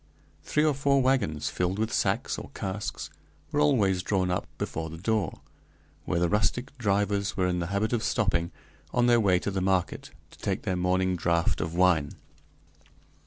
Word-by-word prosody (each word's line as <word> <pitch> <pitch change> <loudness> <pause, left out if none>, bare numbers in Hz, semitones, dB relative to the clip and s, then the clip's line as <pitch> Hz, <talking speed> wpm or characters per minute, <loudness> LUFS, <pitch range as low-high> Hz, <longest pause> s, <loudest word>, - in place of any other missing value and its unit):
Three 150 - +1
or 155 - +3
four 140 0 +2
wagons, 115 - +1
filled 90 +2 -1
with 110 +1 -1
sacks - - 0
or - - -9
casks, 100 +1 -4 0.4
were 145 - 0
always 105 -11 +3
drawn 95 -1 0
up 90 - -2
before 80 0 -4
the 80 - -8
door, 105 -1 -1 0.6
where 85 - 0
the 85 - +2
rustic 105 +8 0
drivers 100 -2 0
were 95 - +2
in 90 -1 0
the 85 - -2
habit 100 +5 -1
of 115 - +1
stopping, 90 -7 0 0.4
on 120 - +2
their 120 -1 +5
way 95 -5 +3
to 100 - -2
the 95 -1 -2
market, 95 -1 0 0.2
to - - -17
take - - -2
their 95 - -1
morning 90 +1 +1
draught 85 -1 +1
of 80 +1 -3
wine. 85 -5 +3
95 Hz, 175 wpm, -27 LUFS, 90-110 Hz, 0.6 s, their